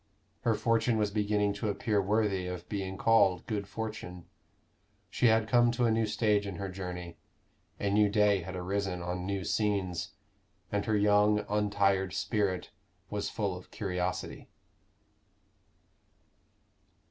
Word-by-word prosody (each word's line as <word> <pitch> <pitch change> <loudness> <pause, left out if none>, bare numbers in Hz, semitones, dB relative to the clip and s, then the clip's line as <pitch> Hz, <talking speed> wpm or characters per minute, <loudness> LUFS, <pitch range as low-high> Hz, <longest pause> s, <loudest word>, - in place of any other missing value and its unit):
Her 115 -2 +1
fortune 115 +1 +2
was 105 -1 +1
beginning 105 -1 +1
to 105 +1 -3
appear 100 +1 0
worthy 100 -2 0
of 90 -1 -6
being 95 -2 -4
called 95 -6 +3
good 105 -3 -3
fortune. 105 -6 -6 0.9
She 125 - +3
had 110 -1 +3
come 120 0 +4
to 120 0 +1
a 115 - +3
new 110 0 +1
stage 105 -1 +1
in 100 - -5
her 100 +1 -4
journey; 90 -2 -6 0.6
a 100 - 0
new 105 0 +4
day 105 -2 +3
had 95 +2 -7
arisen 90 0 -2
on 90 +1 -3
new 100 -1 -2
scenes, 100 -3 -1 0.6
and 100 0 -1
her 110 -1 +2
young 105 0 +3
untired 100 -2 +1
spirit 100 -5 -1 0.4
was 105 -1 -2
full 100 -5 -2
of 90 - -11
curiosity. 90 -2 -3
100 Hz, 135 wpm, -30 LUFS, 95-105 Hz, 0.9 s, come